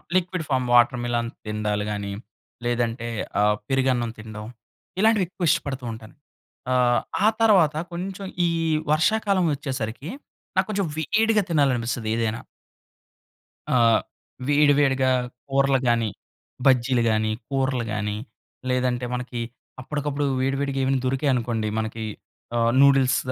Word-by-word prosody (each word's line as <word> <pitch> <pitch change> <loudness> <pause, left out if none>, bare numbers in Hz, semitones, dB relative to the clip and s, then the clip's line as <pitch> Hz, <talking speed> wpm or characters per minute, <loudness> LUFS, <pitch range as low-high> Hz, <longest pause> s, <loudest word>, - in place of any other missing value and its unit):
Liquid 180 -2 0
form 130 -2 +1
watermelon 120 -1 +3 0.2
తిండాలు 105 -1 -1
గాని, 100 -1 -3 0.5
లేదంటే 120 -1 -1 0.3
ఆ - - +4 0.3
పెరుగన్నం 130 -3 +1
తిండం. 110 0 -8 0.5
ఇలాంటివి 215 -3 +4
ఎక్కువ 180 -2 -3
ఇష్టపడుతూ 140 -5 0
ఉంటాను. 110 -1 -10 0.6
ఆహ్, 125 -1 +3 0.2
ఆ - - +7
తరువాత 180 -9 +5 0.2
కొంచెం 190 +2 -5 0.2
ఈ - - +2 0.4
వర్షాకాలం 195 +3 +2
వచ్చేసరికి, 135 0 -4 0.5
నా - - +7
కొంచెం 200 -3 0
వేడిగా 215 +7 +2
తినాలనిపిస్తది 125 -7 +1
ఏదైనా. 115 0 -1 1.3
ఆ - - +4 0.7
వేడివేడిగా 145 -3 +4 0.4
కూరలు 135 0 +3
గాని, 115 -2 +2 0.6
బజ్జీలు 125 -2 +4
గాని, 110 0 +1 0.2
కూరలు 130 -3 0
గాని 105 -1 -2 0.5
లేదంటే 125 -1 0
మనకి 125 -1 -4 0.4
అప్పడికప్పుడు 145 +1 -2 0.2
వేడి, 135 +1 +1
వేడిగా 140 -1 -1
ఏవైనా 135 -1 +1
దొరికాయి 135 +2 +1
అనుకోండి. 115 -3 -1
మనకి 110 0 -3 0.5
ఆహ్, 115 0 +3
నూడిల్స్ 135 -1 +5
130 Hz, 115 wpm, -24 LUFS, 115-145 Hz, 1.3 s, ఆ